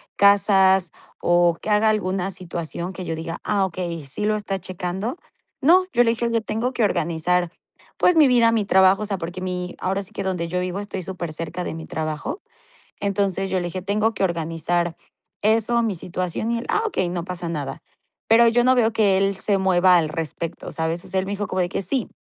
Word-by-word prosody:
casas 195 -3 +4 0.3
o 175 -1 +3
que 215 - -3
haga 210 +1 +4
alguna 195 -3 0
situación 175 -1 -5
que 185 - -6
yo 165 - -3
diga: 165 +1 -5
"Ah, 200 -2 +1
okey, 170 -3 -5
sí 135 +10 -2
lo 215 0 +2
está 200 -2 -3
checando", 185 - -4 0.4
no, 355 +7 +5
yo 245 - +5
le 230 - +3
dije: 235 +1 -1
"Oye 230 -1 0
tengo 230 +4 -2
que 240 - 0
organizar, 175 -1 +1 0.5
pues, 360 - +4
mi 310 -3 +6
vida, 235 -3 +4
mi 220 -3 +1
trabajo", 190 0 +4
o - - -2
sea, 200 -2 -2
porque 175 +1 -6
mi, 180 -1 -4
ahora 195 +2 -1
sí 190 - -10
que - - -5
donde 180 -3 -2
yo 180 +2 -2
vivo 180 +1 -3
estoy 200 -2 -5
supercerca 170 -1 -5
de - - -4
mi 160 0 -8
trabajo, 155 - -4 0.6
entonces, 195 -1 0
yo 190 - +1
le - - -4
dije: 185 +1 -5
"Tengo 210 +3 0
que 195 - 0
organizar 170 0 -1 0.5
eso, 225 +2 +2
mi 220 -3 0
situación", 180 +5 -3
y 235 - 0
él, 230 - -6
"Ah, 425 - +1
okey, 185 - -1
no 175 -1 -3
pasa 180 -1 -5
nada", 145 -5 -5 0.5
pero 230 +1 +6
yo 240 +1 +3
no 255 +1 +5
veo 230 -3 +3
que 205 -4 +3
él 195 0 +1
se 195 +1 +1
mueva 185 -1 +4
al 160 -2 0
respecto, 165 +1 -5
¿sabes? 165 +1 -2
o - - -7
sea, 190 - +1
él 190 - -5
me 200 - -3
dijo 205 0 -2
como 185 - -1
de 175 - +1
que, 195 - -3
"Sí", 255 +3 -1
190 Hz, 215 wpm, -22 LUFS, 175-210 Hz, 0.6 s, mi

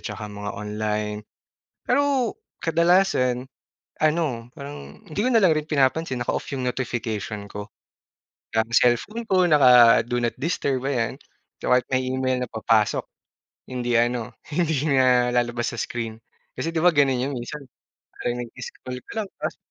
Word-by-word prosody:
tsaka 105 0 -6
mga 105 0 -5
online. 105 0 -3 0.6
Pero 270 -3 +1 0.3
kadalasan 165 -7 +3 0.6
ano, 150 -7 0
parang 75 - -9
hindi 155 - -10
ko 255 - +2
nalang 195 -8 +5
rin 155 - -1
pinapansin, 135 -1 +1
naka-off 120 - -2
yung 130 -2 -2
notification 110 -4 -3
ko. 105 0 -6 0.9
Ang 110 +1 +1
cellphone 125 - +2
ko 185 -2 +4
naka-do 125 -5 +6
not 120 -1 0
disturb, 140 -5 0
ayan. 120 -5 0 0.5
Kaya 125 - +4
kahit - - -28
may 130 0 +2
email 130 0 0
na - - -19
papasok 110 -1 +1 0.6
hindi 120 -1 -2
ano, 120 0 0 0.2
hindi 160 -3 +1
na 125 -2 +4
lalabas 120 -1 0
sa - - -9
screen. 115 -2 -4 0.4
Kasi 165 - -2
di 165 - 0
ba 180 - +6
ganun 135 -3 +3
yun 140 +2 -2
minsan 120 +5 -6 0.6
parang 120 - -2
nag-disconnect 125 +1 -8
ka - - -7
lang 200 - -8
tapos - - -2
125 Hz, 145 wpm, -24 LUFS, 115-150 Hz, 0.9 s, naka-do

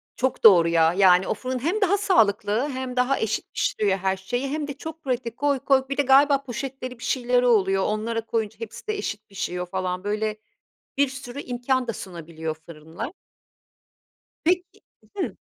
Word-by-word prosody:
Çok 260 0 -1
doğru, 180 -6 +8
ya. 165 0 +3
Yani, 185 -1 +5
o - - +1
fırın 255 0 -4
hem 355 - -1
daha 395 +1 +3
sağlıklı, 235 - +2
hem 260 -1 -4
daha 250 +2 +2
eşit 220 -1 -2
pişiriyor 200 -2 +1
her 190 0 -1
şeyi 245 +8 -3
hem 300 0 -3
de 280 - -4
çok 320 +2 -9
pratik, 245 -3 -3
koy 285 -1 +1
koy. 265 0 +2
Bir 275 - -3
de - - +4
galiba 275 +1 +5
poşetleri, 255 -1 -6
bir - - -10
şeyleri 250 -1 +1
oluyor, 195 -4 +3
onlara 225 +2 -2
koyunca 220 -1 -2
hepsi 225 - -8
de 430 -1 -1
eşit 210 - -5
pişiyor 180 -2 -3
falan. 185 0 -3
Böyle, 215 +1 -1 0.6
bir 280 -1 +3
sürü 270 0 -7
imkân 250 0 -1
da - - 0
sunabiliyor 165 -5 -6
fırınlar. 165 - -7 1.3
Peki 355 +2 0 0.4
Hı? 375 - -2
240 Hz, 170 wpm, -24 LUFS, 195-270 Hz, 1.3 s, doğru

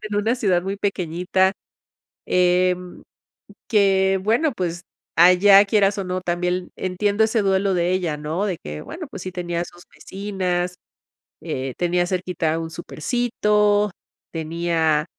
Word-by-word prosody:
en 215 -1 -5
una 220 +4 +1
ciudad 185 -7 +2
muy 195 +1 -3
pequeñita, 185 -1 0 0.7
em, 180 0 +1 0.7
que 195 -3 +3
bueno, 245 +8 +2
pues 175 -4 -3 0.3
allá 185 +4 +7
quieras 200 -1 +2
o 195 - -2
no, 185 0 -3
también 180 0 -2
entiendo 205 +4 +1
ese 220 0 +1
duelo 195 0 +1
de 175 +1 +1
ella, 175 -5 -1
¿no?, 155 +6 -2
de 180 -5 -3
que 75 0 -7
bueno, 335 -2 -8
pues 195 - -8
sí 185 - -6
tenía 175 -1 -3
sus 175 0 -15
vecinas, 185 -3 -3 0.7
eh, 130 -1 -4
tenía 175 0 +1
cerquita 180 -3 -1
un 165 0 -5
supercito, 210 +3 0 0.4
tenía, 160 -1 0
185 Hz, 135 wpm, -22 LUFS, 175-200 Hz, 0.7 s, allá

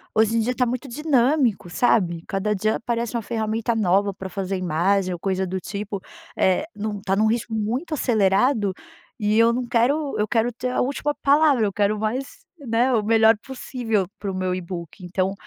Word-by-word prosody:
hoje 220 +1 +3
em - - +3
dia 245 +3 0
tá 250 - +2
muito 250 +3 -3
dinâmico, 260 - +1
sabe? 175 -7 +1
Cada 210 +2 -1
dia 215 +3 0
aparece 235 0 -3
uma 230 - 0
ferramenta 225 +1 -1
nova 200 -1 +2
pra 190 0 -7
fazer 195 0 -3
imagem 185 +2 +1
ou 175 - -6
coisa 190 0 -1
do 185 +1 -3
tipo, 200 +2 -5 0.4
eh, 190 - +2
não 205 -1 -4
tá 195 0 0
num 215 +2 +3
ritmo 225 0 -1
muito 250 +10 -2
acelerado 215 -3 +2 0.5
e 210 +1 +1
eu 230 +1 +5
não 245 0 -2
quero 275 +6 +1
eu 210 0 0
quero 235 +1 +1
ter 250 +2 -3
a - - 0
última 285 +3 -1
palavra. 285 -5 +4
Eu 200 - -2
quero 205 +1 +1
mais, 245 +5 -4
né, 250 -1 +1
o 215 -3 +2
melhor 225 0 +5
possível 240 -7 -2
para 200 -2 -4
o - - -5
meu 185 -1 -1
e-book. 175 0 -7
Então, 185 +2 -1
220 Hz, 190 wpm, -23 LUFS, 195-245 Hz, 0.5 s, eu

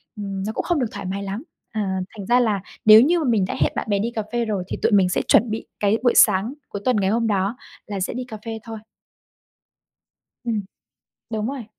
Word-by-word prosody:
ừm, 195 -2 -4
nó 215 - -2
cũng - - -2
không 345 -4 0
được 245 - 0
thoải 200 -2 -7
mái 195 +2 -3
lắm. 200 +7 -5 0.3
À, 195 -4 -2 0.2
thành 200 - -6
ra 245 +1 +4
là 215 -6 +1 0.2
nếu 215 +1 +10
như 335 +7 +3
mà 315 - -1
mình 210 -5 +2
đã - - -3
hẹn - - +2
bạn - - -3
bè 200 -1 +2
đi 230 +3 -1
cà 220 -2 -3
phê 240 -1 0
rồi 205 -4 -2
thì - - -4
tụi - - +2
mình 195 -3 +4
sẽ - - +1
chuẩn 225 +2 +5
bị 220 - -4
cái 205 +1 +2
buổi 245 - +4
sáng 210 +4 +5 0.2
cuối 200 - -6
tuần 255 - +3
ngày 190 - +2
hôm 230 +2 +1
đó 200 +2 0 0.3
là 200 -2 -4
sẽ 185 - -2
đi 250 +1 -4
cà 220 -3 -7
phê 225 -1 -4
thôi. 225 -1 -7 1.6
Ừm. 225 -3 -1 0.7
Đúng 220 -1 -2
rồi. 265 -3 -5
215 Hz, 240 wpm, -22 LUFS, 200-235 Hz, 1.6 s, nếu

